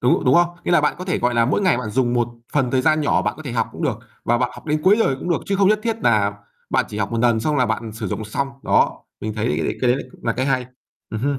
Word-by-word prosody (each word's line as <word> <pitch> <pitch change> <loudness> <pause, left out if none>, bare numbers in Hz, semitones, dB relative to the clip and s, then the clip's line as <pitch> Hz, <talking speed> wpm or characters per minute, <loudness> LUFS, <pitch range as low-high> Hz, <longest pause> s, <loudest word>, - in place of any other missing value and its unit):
đúng, 125 - +2
đúng 130 +2 +4
không? 175 0 +5 0.2
Nghĩa - - -1
là 170 - +5
bạn 150 - +1
có 180 - -5
thể, 185 - -1
gọi 125 0 0
là, 115 - +4
mỗi 130 - +1
ngày 185 -7 +3
bạn 110 -4 -4
dùng 120 0 +1
một 120 -1 +1 0.2
phần 135 -4 +1
thời 130 0 +1
gian 155 +1 +3
nhỏ 145 - +2
bạn - - -1
có 155 - -9
thể 135 -6 -5
học 115 -2 0
cũng - - -7
được - - 0 0.3
và 120 +1 +2
bạn 125 0 0
học - - -13
đến 150 0 0
cuối 195 +5 +5
đời 135 -11 +2
cũng 175 - -4
được 170 - +1
chứ 195 - 0
không 195 0 +4
nhất 215 0 +3
thiết 225 -1 -1
nà 105 -3 +3 0.4
bạn - - +2
chỉ 105 - -6
học 100 +2 -2
một 115 - 0
nần 115 -2 +3
xong 150 +4 0
là 125 - +3
bạn 115 -2 -3
sử 110 -1 -5
dụng 110 - -3
xong, 135 +6 -2
đó, - - +2 0.2
mình 110 0 -4
thấy 110 0 -1
đ - - +1 0.3
cái 125 - +2
đấy 125 - +3
lại - - -5
cũng - - -18
là 115 - +1
cái 130 +4 -1
hay. 130 -2 0 0.4
Ừm 110 - -4
hưm. 140 +2 0
130 Hz, 325 wpm, -21 LUFS, 115-155 Hz, 0.4 s, không